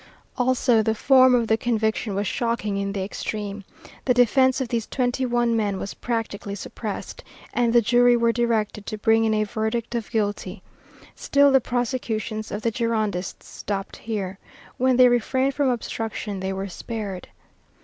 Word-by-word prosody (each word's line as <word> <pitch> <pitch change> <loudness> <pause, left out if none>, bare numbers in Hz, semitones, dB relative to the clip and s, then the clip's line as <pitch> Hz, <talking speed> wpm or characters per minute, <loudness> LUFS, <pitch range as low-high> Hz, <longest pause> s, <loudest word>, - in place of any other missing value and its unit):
Also 245 -2 +3
the 220 +1 0
form 260 +1 +5
of 235 -2 +1
the 220 - +3
conviction 220 -2 -1
was 200 +1 -1
shocking 230 -2 -1
in 200 0 -2
the 195 -1 -3
extreme. 205 0 -5 0.4
The 250 - +3
defence 260 +2 +4
of 260 - -2
these 230 -3 -2
twenty 255 0 -1
one 240 -1 +1
men 205 -3 0
was, 195 - -5
practically, 225 -4 -4
suppressed, 205 +1 -6 0.3
and 240 -1 +2
the 235 0 +5
jury 245 +2 +4
were 235 0 +3
directed 225 -3 -1
to 215 - -4
bring 225 +1 +3
in 220 - +2
a 215 - +2
verdict 220 +2 -2
of 235 -3 -3
guilty. 205 -5 -2 0.5
Still 280 0 +3
the 265 -1 +5
prosecutions 230 -3 -2
of 210 +1 -5
the 230 - +1
Girondists 215 -5 -2
stopped 195 -1 -5
here. 200 -4 -4 0.4
When 255 0 +2
they 255 -1 +8
refrained 260 +3 +1
from 280 -1 +1
obstruction, 225 -4 -3
they 190 +1 -2
were 195 +1 -3
spared. 200 -1 -6
225 Hz, 165 wpm, -24 LUFS, 205-245 Hz, 0.5 s, they